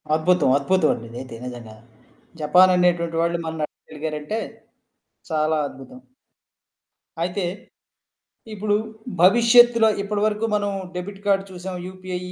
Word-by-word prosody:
అద్భుతం. 160 -1 +2
అద్భుతం 160 +3 +2
అండి 115 - -8
ఇదైతే 120 +1 -8
నిజంగా. 120 -3 -9 0.7
జపాన్ 180 +5 +5
అనేటువంటి 170 -2 +1
వాళ్ళు 170 +1 0
మన్ని 160 -1 -3
ఆడగలిగారంటే. 155 +7 -6 0.9
చాలా 155 0 +1
అద్భుతం. 130 -2 -12 1.2
అయితే, 180 +3 -2 1.1
ఇప్పుడు 210 0 0 0.5
భవిష్యత్తులో 230 +3 +6
ఇప్పటి 205 +1 -2
వరకు 215 +1 -1
మనం 205 -1 -1 0.3
డెబిట్ 195 +2 -6
కార్డ్ 195 -1 +2
చూసాం. 180 0 -7
యూపీఐ 185 -1 -6
180 Hz, 105 wpm, -22 LUFS, 155-200 Hz, 1.2 s, భవిష్యత్తులో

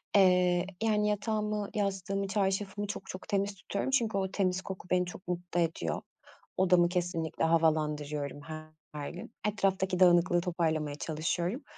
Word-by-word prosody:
Eee, 180 -2 +5 0.2
yani, 210 -1 +2
yatağımı, 210 0 -1
yastığımı, 195 -1 -1
çarşafımı 200 +1 -1
çok 200 - -5
çok 185 - -8
temiz 200 0 0
tutuyorum 200 +5 -3
çünkü 230 -6 +2
o 190 -1 -1
temiz 185 -2 +1
koku 190 -2 -7
beni 180 0 +3
çok 180 +2 -10
mutlu 175 0 -2
ediyor. 160 - -1 0.6
Odamı 180 -2 +5
kesinlikle 175 -3 -1
havalandırıyorum 150 -3 +1
her 155 -1 -8
gün. 180 +4 -9 0.2
Etraftaki 190 -3 +1
dağınıklığı 175 -1 +5
toparlamaya 160 -4 -1
çalışıyorum 170 - -2
180 Hz, 130 wpm, -31 LUFS, 165-195 Hz, 0.6 s, Eee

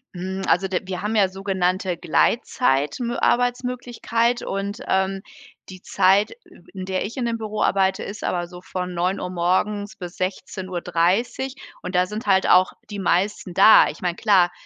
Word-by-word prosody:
Mhm. 190 +2 -4
Also, 180 +3 +2
der 185 0 -2
wir 185 -1 -4
haben 210 +2 -2
ja 200 -3 +4
sogenannte 185 -1 -1
Gleitzeit 150 - +1
Mö 240 0 -2
Arbeitsmöglichkeit 245 -1 0
und, 200 +2 -4
ähm, 190 0 0 0.5
die 185 -1 -11
Zeit, 200 +3 +3 0.4
in 190 -2 -6
der 190 0 -2
ich 225 +6 -7
in 250 - -1
dem 230 -1 -1
Büro 215 -1 -4
arbeite, 190 -1 +2
ist 200 +1 -7
aber 175 -1 -1
so 180 0 -11
von 180 0 -5
09:00 180 +2 -1
morgens 185 +4 -1
bis 175 -2 -8
16:30. 185 - -2 0.3
Und 180 - -5
da 180 0 +4
sind 210 +4 -7
halt 190 -1 +3
auch 185 +1 +5 0.2
die 205 -1 -6
meisten 185 0 0
da. 215 -3 +7
Ich 150 - -9
meine, 175 -2 -1
klar, 190 -4 +3
190 Hz, 165 wpm, -22 LUFS, 180-210 Hz, 0.5 s, da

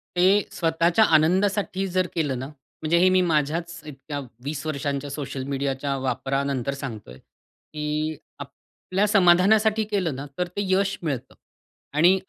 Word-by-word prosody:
ते 190 +3 +4
स्वतःच्या 170 +4 +2
आनंदासाठी 190 +4 +2
जर 185 0 0
केलं 145 -6 -1
ना 130 - -5
म्हणजे 155 +3 -3
हे 185 +2 +5
मी 185 0 +4
माझ्याच 165 +1 0
इतक्या 145 0 -7 0.2
20 140 +1 -4
वर्षांच्या 140 -1 -2
सोशल 140 -2 -5
मीडियाच्या 140 0 -2
वापरानंतर 135 +1 -1
सांगतो 115 - -7
आहे 65 - -13
की 150 0 -6 0.2
आपल्या 195 +3 -3
समाधानासाठी 210 +3 +4
केलं 180 -8 0
ना 135 +2 -6
तर 180 0 0
ते 190 +3 -4
यश 195 +1 +1
मिळतं. 140 -7 -3 0.6
आणि 175 +6 +5
155 Hz, 135 wpm, -24 LUFS, 140-185 Hz, 0.6 s, हे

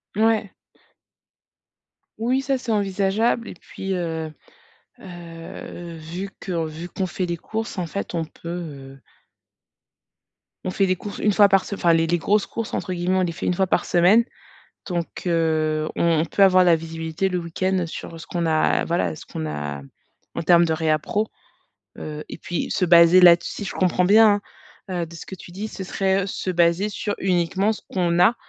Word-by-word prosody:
Ouais. 220 -2 +2 1.7
Oui, 250 +4 +1
ça 270 0 0
c'est 250 -2 -4
envisageable 205 +3 +1
et - - -7
puis, 190 +2 -6
heu 160 -3 -3 0.7
heu, 170 -1 -9
vu 170 +5 -6
que 170 -4 -2
vu 160 +2 -7
qu'on 190 - -2
fait 185 +1 -3
les 170 0 -2
courses 220 +5 -5
en 180 -2 -2
fait 200 +3 -5
on 165 -1 -1
peut, 165 - -14
heu 140 -6 -7 1.7
On 185 - -1
fait 195 +1 +1
des 185 - +2
courses 205 +2 -7
1 210 - +2
fois 205 0 +6
par 195 -1 +3
se 200 - -5
enfin 170 -3 +3
les 165 0 +3
«les 175 +1 +2
grosses 205 +4 +1
courses» 230 -2 -5
entre 185 - -2
guillemets, 180 +1 0
on - - +2
les 175 -2 0
fait 165 - -6
1 - - +2
fois 190 +1 +1
par - - +1
semaine, 190 +7 +4 0.6
donc 175 -2 -2 0.2
heu, 155 -2 +1
on 165 -2 +2
on - - +1
peut 200 - +1
avoir 185 -1 +6
la 170 -2 +5
visibilité 165 +2 -3
le 180 - -1
week-end 180 +2 -1
sur 165 0 -8
ce - - -10
qu'on 175 -1 -2
a 155 -1 +2
voilà, 90 - -1
ce - - -11
qu'on 80 - -5
a 75 -2 -4 0.5
en - - -3
termes 170 +1 +5
de 160 - +1
réapprovisionnement, 160 +7 0 0.7
heu 150 0 -6
et - - -7
puis 175 - -4
se 180 - +1
baser 170 +1 +7
là-des 175 -1 +7
si 205 - -5
je - - -5
comprends 180 -1 +2
bien, 210 +1 +6 0.5
hein, 185 -2 -3
heu, - - -2
de 165 - -13
ce 165 - -9
que - - -7
tu 180 - -12
dis, 205 +4 -5
ce 195 - -7
serait 195 0 0
se 190 -1 -3
baser 175 +3 +2
sur 205 0 -3
uniquement 190 +3 +1
ce - - -12
qu'on 175 -2 0
a, 180 +7 +5
175 Hz, 190 wpm, -23 LUFS, 165-195 Hz, 1.7 s, baser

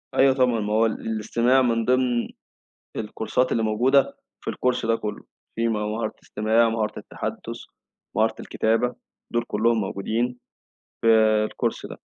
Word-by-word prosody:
أيوه 135 0 +5
طبعًا 125 -3 +2
ما 105 0 -2
هو 110 +1 +4
ال 110 - +2 0.2
الاستماع 115 +4 +2
من 115 -2 +1
ضمن 125 -1 +2 0.7
الكورسات 110 +4 -1
اللي 115 - +1
موجودة 125 +6 +3 0.2
في - - -3
الcourse 125 -2 0
ده 115 0 +3
كُلّه، 105 -2 -5 0.3
في 115 0 +1
مهارة 110 0 -2
إستماع، 110 +2 +2
مهارة 110 -1 -2
التحدث، - - -6 0.6
مهارة 110 0 +2
الكتابة، 115 +3 0 0.4
دول 120 0 +1
كُلّهم 115 +2 +2
موجودين 115 +5 -2 0.7
في 110 -1 +4
الcourse - - -2
ده. - - -9
115 Hz, 140 wpm, -24 LUFS, 110-125 Hz, 0.7 s, أيوه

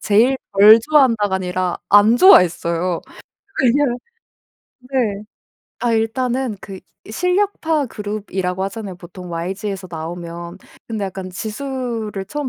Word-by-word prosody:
제일 230 +6 +3 0.2
덜 210 +3 +8
좋아한다가 230 -8 +3
아니라 180 -1 -2
안 205 +3 +6
좋아했어요. 175 - +4 0.6
왜냐. 270 +3 +3 1.0
네. 250 -6 -2 0.6
아 240 -1 +1
일단은 240 +1 -1
그 190 -2 -9 0.3
실력파 360 - 0
그룹이라고 195 -4 -4
하잖아요 195 -2 -6
보통 180 0 -11
YG에서 190 +3 -4
나오면. 170 +2 -7 0.3
근데 220 -3 -3
약간 190 -1 -7
지수를 225 -1 -4
처음 295 +1 -4
210 Hz, 265 characters per minute, -19 LUFS, 185-250 Hz, 1.0 s, 덜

